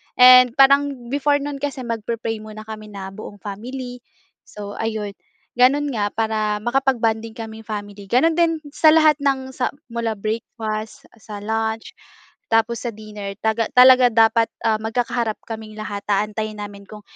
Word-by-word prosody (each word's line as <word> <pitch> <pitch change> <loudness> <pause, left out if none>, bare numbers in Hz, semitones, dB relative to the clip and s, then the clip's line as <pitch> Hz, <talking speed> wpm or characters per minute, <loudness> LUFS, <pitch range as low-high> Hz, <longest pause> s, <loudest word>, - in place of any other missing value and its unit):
and 250 -1 +8
parang 275 -2 +3
before 285 +1 +2
no'n 285 -1 -5
kasi 280 -2 -4
magpe-pray 230 -1 -3
muna 215 0 -10
kami 215 -1 -9
na 195 -2 -8
buong 205 +1 -9
family. 245 +5 -6 0.5
So 205 -1 -8
ayun. 215 -2 -3 0.5
Gano'n 280 +4 +4
nga 205 -5 -2
para 215 -2 -1
makapag-bonding 230 -3 0
kaming 225 -1 -9
family. 205 -1 -7
Gano'n 315 - +2
din 330 -2 +2
sa 310 +2 +5
lahat 310 -2 +5
ng 270 -2 -1
sa 255 -1 -2 0.2
mula 230 -1 -2
breakfast, 215 +1 -5
sa 210 -1 -9
lunch, 220 +1 -3 0.5
tapos 225 +1 +2
sa 235 - -3
dinner 210 -2 -8
taga 220 +1 +1
talaga 255 0 +8
dapat, 225 0 +4 0.2
ah, 220 -1 +3
magkakaharap 230 -1 -1
kaming 220 -1 -7
lahat. 205 -1 -5
Aantayin 210 +1 -1
namin 200 -1 -9
kung 210 +2 -12
225 Hz, 145 wpm, -21 LUFS, 215-255 Hz, 0.5 s, and